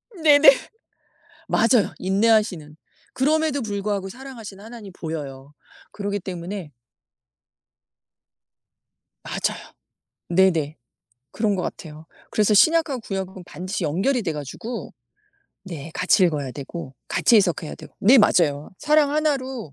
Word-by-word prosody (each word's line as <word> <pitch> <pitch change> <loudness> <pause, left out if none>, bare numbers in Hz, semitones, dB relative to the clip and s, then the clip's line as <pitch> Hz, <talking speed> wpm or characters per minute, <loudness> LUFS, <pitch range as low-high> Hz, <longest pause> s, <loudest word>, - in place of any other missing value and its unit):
네네. 300 -4 +7 1.0
맞아요. 225 -4 +3
인내하시는. 195 -6 +1 0.4
그럼에도 305 +1 +1
불구하고 200 -2 -3
사랑하시는 225 -5 -10
하나님이 225 -3 -10
보여요. 145 -5 -7 0.4
그러기 205 0 -3
때문에 180 -2 -6 2.5
맞아요. - - -4 0.6
네네. 170 -4 +2 0.6
그런 215 -2 0
것 185 - -2
같아요. 155 -2 -7 0.2
그래서 210 0 +2
신약하고 315 +2 +4
구약하곤 190 -3 -6
반드시 185 +2 -5
연결이 215 - 0
돼 170 -5 -2
가지고 155 - -6 0.7
네 165 -4 -8
같이 185 +3 +3
읽어야 150 -6 -1
되고 140 +1 -8
같이 235 - +3
해석해야 175 -6 +1
되고 - - -14
네 240 +7 +6
맞아요. 150 -9 +2
사랑 300 -1 +3
1 305 -1 +2
로 255 - -7
200 Hz, 275 characters per minute, -23 LUFS, 170-240 Hz, 2.5 s, 네네